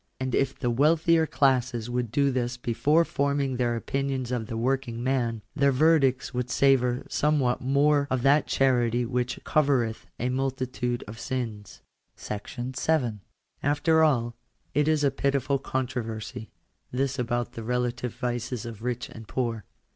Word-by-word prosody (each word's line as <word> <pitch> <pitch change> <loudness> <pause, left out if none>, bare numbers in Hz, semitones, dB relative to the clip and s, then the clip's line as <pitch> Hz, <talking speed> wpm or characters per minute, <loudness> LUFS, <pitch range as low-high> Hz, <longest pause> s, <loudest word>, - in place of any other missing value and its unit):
.^ - - -47 0.2
And 130 -1 -2
if 135 -1 +1
the 120 -3 0
weal 150 +7 +4
thier 160 0 +3
classes 125 -4 +1
would 120 -1 -2
do 140 +2 +2
this 120 -1 -2
before 145 +8 +2
forming 140 -3 0
their 120 -1 +1
opinions 135 +1 -2
of 120 -3 -2
the 115 - -4
working 130 0 -1
mi^ffielFyerdicts 135 +3 +2
wouIoTsavour 125 0 +2
some 150 0 +2
what 125 -2 +1
more 140 +2 +3
of 130 -2 -1
that 140 +2 +4
charity 120 -2 +2
which 125 +1 -2
covereth 135 -7 +1
a 125 - 0
multitude 130 -2 -2
of 110 +1 -9
sins. 115 -5 -5 0.3
§7. 125 +2 -2 0.4
After 150 +3 +3
all 120 -6 +2 0.2
' - - -42
it 150 +1 +2
is 155 -2 +2
a 140 - +3
pitiful 140 0 0
controversy, 115 -5 -4 0.4
this 135 +1 -1
about 120 0 -1
the 115 - -7
rela 125 +1 -1
tive 125 -1 -5
vices 120 -1 -3
of 115 -2 -8
rich 125 0 -3
and 110 -1 -11
poor. 115 -6 -2
125 Hz, 150 wpm, -27 LUFS, 120-140 Hz, 0.4 s, weal